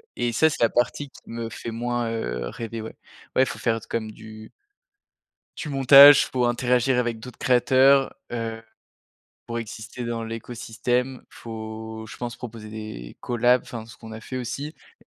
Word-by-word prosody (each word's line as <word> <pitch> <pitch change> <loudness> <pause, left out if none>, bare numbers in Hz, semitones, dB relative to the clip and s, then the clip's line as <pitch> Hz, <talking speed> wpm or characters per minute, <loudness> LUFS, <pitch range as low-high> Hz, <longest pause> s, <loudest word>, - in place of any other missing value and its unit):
et 120 -1 0
ça 160 +7 +4
c'est - - -5
la 115 - +5
partie 135 +4 0
qui - - -16
me 115 -1 -4
fait 115 - -7
moins, 120 0 -2
heu, - - -3
rêver 115 - -6
ouais, 110 - -8 0.4
ouais 130 - +6
il - - +2
faut - - -6
faire 115 -1 +1
d - - -13
comme 110 -2 -2
du 110 0 -12 1.1
du 150 - -5
montage 140 +1 +8
pour 125 -2 +2
interagir 125 +1 +2
avec 120 -2 0
d'autres 125 +2 -10
créateurs, 130 +2 +4 0.2
heu, 115 -1 -4 0.8
pour 115 0 -3
exister 115 +2 -7
dans 115 -1 -3
l'écosystème. 120 +2 -3
Faut, 110 -1 -7
je - - -9
pense, 120 -1 -5
proposer 110 -3 -8
des 110 - -8
collabs, 120 +1 +2
enfin 115 -2 -7
ce 115 -1 -14
qu'on 110 -1 -11
a 110 - -7
fait 130 - -7
aussi 140 +5 -4 0.3
et - - -23
115 Hz, 175 wpm, -24 LUFS, 110-125 Hz, 1.1 s, montage